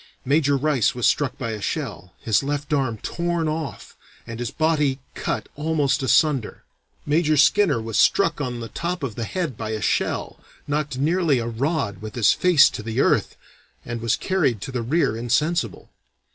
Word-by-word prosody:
Major 140 +1 +3
Rice 140 -6 +1
was 125 - -1
struck 145 -4 +1
by 115 -3 -3
a 105 -1 -5
shell, 100 - -4
his 110 -3 +2
left 145 +1 -3
arm 130 -6 0
torn 170 -1 -1
off, 155 -2 -5 0.3
and 115 0 -7
his 120 -2 -2
body 150 -4 +1 0.2
cut - - -3
almost 150 -2 0
asunder. 135 -2 +1 0.4
Major 155 0 +2
Skinner 150 - +4
was 110 -1 -2
struck 195 -6 +3
on 125 -3 -3
the 115 - -5
top 175 -1 -4
of 130 -5 -3
the 115 +2 -4
head 170 - -3
by 110 0 -5
a 110 0 -2
shell, - - -1 0.3
knocked 150 -2 -2
nearly 160 0 +2
a 115 - -2
rod 120 - -2
with 110 0 -8
his 115 -4 +4
face 180 -5 +5
to - - -6
the 110 +1 -3
earth, - - +2 0.5
and 120 -1 -5
was 115 -1 +1
carried 160 - 0
to 135 - -5
the 125 -2 -2
rear 125 -1 +1
insensible. 120 - -1
140 Hz, 175 wpm, -23 LUFS, 115-155 Hz, 0.5 s, face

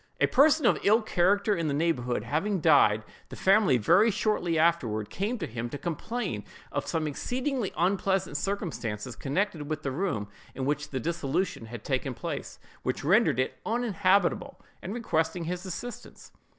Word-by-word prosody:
A - - +5
person 300 +3 +4
of - - +4
ill 220 +3 +4
character 200 +1 +2
in 165 -2 -1
the 140 - 0
neighborhood 125 -8 0
having 170 - -1
died, 140 -10 +5 0.3
the - - -8
family 195 - +4
very 185 - +4
shortly 205 -5 0
afterward 120 -11 +1
came 215 +6 -2
to - - -3
him 120 +1 -5
to 145 - -5
complain 175 - -3 0.3
of - - -3
some 160 -1 -1
exceedingly 250 - -2
unpleasant 190 0 +1
circumstances 145 - -3
connected 150 - -2
with 155 0 -3
the 135 - -1
room 135 - -2 0.3
in 130 - -3
which 145 +1 -1
the 130 - -3
dissolution 160 -3 -2
had 120 -1 -8
taken 130 -1 -2
place, - - -5 0.2
which - - -2
rendered 160 - +3
it 130 - -1
uninhabitable, 200 -6 +1 0.2
and 195 +5 -5
requesting 165 -7 -1
his 180 +3 -4
assistance. 215 +6 -8
170 Hz, 160 wpm, -28 LUFS, 135-200 Hz, 0.3 s, A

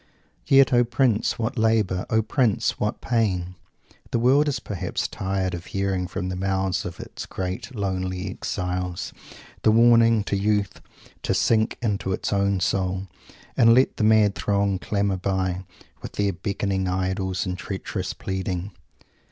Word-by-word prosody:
"Yet, 135 -1 +6
O 120 0 +5
Prince, 120 -2 +1
what 120 +1 -2
labour! 110 -5 +1
O 110 0 +2
Prince, 115 -3 +1
what - - -2
pain!" 95 -7 0 0.6
The - - 0
world 135 +6 +4
is 135 -3 0
perhaps 95 -6 -3
tired 95 -1 -2
of 85 0 -6
hearing 95 -2 -1
from 90 0 -4
the 90 - -3
mouths 95 0 -1
of 85 - -6
its - - -8
great 95 +7 -5
lonely 95 -2 -2
exiles 90 -1 -3 0.5
the - - +4
warning 115 -1 +5
to 100 - -2
youth 105 0 0 0.4
"to 95 - 0
sink 110 +3 +2
unto 100 -4 -1
its - - -2
own 100 -1 +1
soul," 95 +1 -1 0.5
and 115 -1 +6
let 130 +2 +3
the - - 0
mad 110 -2 +5
throngs 100 -2 0
clamour 100 -2 0
by, 95 -1 -1 0.4
with - - -8
their 100 -1 0
beckoning 95 +1 -2
idols, 95 0 -1
and 90 -1 -2
treacherous 80 - -4
pleading. 95 0 -3
100 Hz, 150 wpm, -24 LUFS, 95-110 Hz, 0.6 s, Yet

